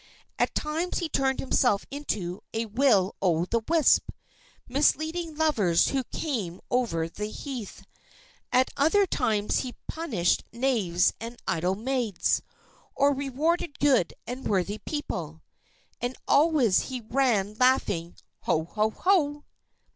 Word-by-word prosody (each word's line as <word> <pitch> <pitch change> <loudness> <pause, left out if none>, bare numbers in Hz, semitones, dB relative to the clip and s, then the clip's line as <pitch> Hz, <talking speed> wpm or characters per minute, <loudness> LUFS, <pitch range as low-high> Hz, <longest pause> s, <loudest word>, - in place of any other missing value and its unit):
At - - +1
times 320 +4 -1
he 340 - -1
turned 265 -2 0
himself 245 -6 +2
into 205 -11 -3
a 225 +1 0
will 220 -4 +2
o' 175 -3 +2
the 230 +4 0
wisp, 330 -3 +4 0.6
misleading 315 +4 +1
lovers 230 - +2
who 270 -1 0
came 215 - -3
over 225 -10 0
the 210 +5 -5
heath; 245 -3 -7 0.7
at 255 +1 +3
other 325 +8 +4
times 210 - 0
he 255 -2 -5
punished 235 - 0
knaves 225 -8 +1
and 230 +1 -7
idle 180 +3 0
maids, 235 -3 0 0.5
or 285 +1 +4
rewarded 285 +4 -1
good 265 -11 +2
and 250 +3 -5
worthy 200 +2 0
people. 165 - -4 0.6
And 245 +1 -2
always 285 - +4
he 255 -2 -4
ran 225 -4 +1
laughing, 200 -10 +2 0.3
"Ho! 160 - +2
Ho! 215 +5 0
Ho!" 295 - +1
245 Hz, 125 wpm, -27 LUFS, 200-285 Hz, 0.7 s, wisp